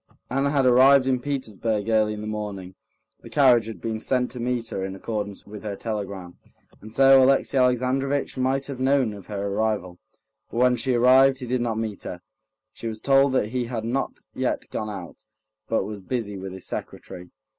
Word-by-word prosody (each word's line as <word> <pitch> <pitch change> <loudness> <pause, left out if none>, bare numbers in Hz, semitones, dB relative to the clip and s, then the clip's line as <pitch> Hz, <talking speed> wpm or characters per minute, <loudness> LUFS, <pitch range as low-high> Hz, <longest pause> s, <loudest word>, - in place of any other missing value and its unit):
Anna 135 +2 +1
had 140 -2 +2
arrived 130 +2 +6
in 130 -1 +1
Petersburg 115 -6 -2
early 110 -1 +2
in 105 - -7
the - - -6
morning; 105 -3 -5 0.5
the - - -13
carriage 125 -6 +4
had 115 - -7
been 110 -1 -3
sent 125 +2 0
to 125 - -7
meet 120 -1 -2
her 95 - -3
in 95 0 -4
accordance 100 0 -5
with 105 0 -9
her 105 -2 -4
telegram, 100 -5 -5 0.4
and 110 - -11
so 135 +2 +6
Alexey 135 +1 +3
Alexandrovitch 130 +2 +1
might 135 +1 0
have 140 -3 -7
known 130 -4 +2
of 100 -2 -11
her 100 -1 -4
arrival. 100 -4 -2 0.5
But - - -7
when 125 0 +4
she 125 +1 0
arrived, 130 +2 +5
he 130 - -7
did 125 0 -1
not 115 -2 -1
meet 110 -3 -4
her. 90 - -7 0.5
She 115 - -7
was 110 -1 -5
told 135 +2 +4
that 110 -5 +1
he 125 0 -2
had 115 -2 -4
not 130 +4 -2
yet - - -2
gone 110 - -3
out, 95 -5 -8 0.5
but 115 - +1
was 105 0 -7
busy 105 0 -3
with 95 0 -6
his 95 -1 -8
secretary. 90 0 -7
115 Hz, 195 wpm, -24 LUFS, 105-130 Hz, 0.5 s, arrived